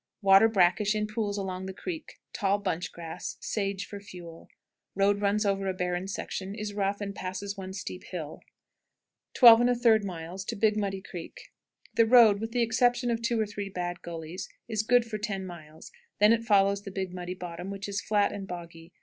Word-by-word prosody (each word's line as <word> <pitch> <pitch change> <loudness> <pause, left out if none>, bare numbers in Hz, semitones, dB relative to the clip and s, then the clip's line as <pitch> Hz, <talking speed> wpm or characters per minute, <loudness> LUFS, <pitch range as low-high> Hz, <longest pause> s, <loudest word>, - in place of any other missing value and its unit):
Water 195 +2 +7
brackish 200 +1 +3
in 210 0 0
pools 210 -1 -2
along 190 -1 -4
the 190 - -7
creek; 320 - -6 0.2
tall 200 0 +1
bunch 180 -4 -3
grass; 165 -2 -7
sage 200 -2 -2
for 205 - -8
fuel. 175 -4 -11 0.5
Road 200 +1 +2
runs 205 +1 +1
over 195 -1 0
a 190 - -1
barren 180 0 -2
section, 195 0 -5
is 210 -1 -5
rough, 200 0 -1
and 200 -1 -4
passes 195 +2 -5
one 190 -2 -7
steep 190 -1 -6
hill. 160 -4 -7 0.9
12 235 -3 +9
1/3. 215 -5 +1
Big 215 -1 +3
Muddy 195 -2 -2
Creek. 175 -4 -9 0.4
The 230 -1 +4
road, 225 -4 +7
with 225 0 -4
the 240 0 +2
exception 245 +1 +2
of 230 0 -1
two 230 0 0
or 220 - +2
three 205 -1 -6
bad 175 -2 -4
gullies, 165 +1 -7 0.2
is 220 -3 0
good 245 +2 +3
for 220 -2 -5
ten 200 -2 -3
miles; 160 -3 -11
it - - -29 0.4
then 230 0 +4
follows 200 -2 +3
the 200 - -8
Big 190 -1 -4
Muddy 180 0 -5
bottom, 180 0 -7
which 200 0 -5
is 200 0 -2
flat 205 -1 +2
and 200 -1 -6
boggy. 170 -1 -9
200 Hz, 185 wpm, -28 LUFS, 185-215 Hz, 0.9 s, 12